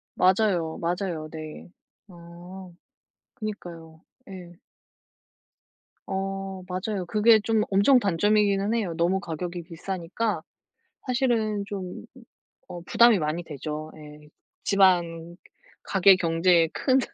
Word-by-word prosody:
맞아요, 185 -4 +2
맞아요 170 -2 -3
네. 155 +1 -9 0.4
아 175 +1 -12 0.7
그니까요. 170 -6 -8 0.2
예. 180 -1 -11 1.5
어 195 0 -4
맞아요. 185 0 -3
그게 215 +3 +4
좀 220 0 +1
엄청 200 +7 +5
단점이기는 205 +1 +1
해요. 200 -8 -1
너무 180 +3 +1
가격이 175 +1 -5
비싸니까 185 +5 -4 0.6
사실은 230 -5 0
좀 190 -3 -7 0.6
어 175 - -7
부담이 235 +3 +5
많이 155 +2 -2
되죠. 155 0 -6
예. 150 0 -13 0.4
지방 175 -4 +2 0.5
가계 195 0 +5
경제에 165 -1 +3
큰 265 -1 +2
185 Hz, 205 characters per minute, -25 LUFS, 170-205 Hz, 1.5 s, 엄청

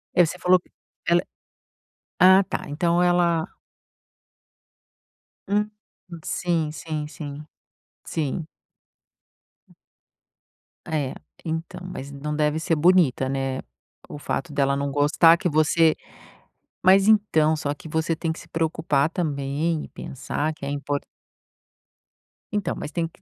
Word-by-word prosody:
É, 180 - +6
você 170 +3 -5
falou 180 0 +4
que - - -29 0.4
ela 175 +1 +4 1.0
ah 190 +1 +7
tá, - - -4
então 170 +4 +1
ela 175 -2 +3 2.0
Hum 210 +1 +1 0.4
hum, 170 - -8
sim, 165 -4 -1
sim, 155 -1 -4
sim. 150 -1 -8 0.6
Sim. 155 +1 -2 2.4
É, 145 -4 -1 0.3
então, 165 +3 -4
mas 140 -6 -7
não 150 +2 -4
deve 150 +1 +1
ser 165 0 +1
bonita, 155 -6 +3
né, 135 -1 -2 0.5
o - - -7
fato 160 +2 -3
dela 140 -1 +1
não 140 0 -2
gostar 155 +4 +5
que 180 - -1
você 155 0 +3 0.9
mas, 195 +2 +6
então, 180 -8 +4
só 145 -1 -2
que 155 - -11
você 160 +1 0
tem 160 0 -1
que - - -9
se - - -14
preocupar 160 -2 0
também 150 -1 -1
e - - -10
pensar 145 +3 -4
que 145 - -9
é 140 - -3
impor 145 0 -2 1.6
então, 205 -4 -1
mas - - -6
tem 165 +1 -1
que 165 - -22
160 Hz, 125 wpm, -24 LUFS, 145-175 Hz, 2.4 s, ah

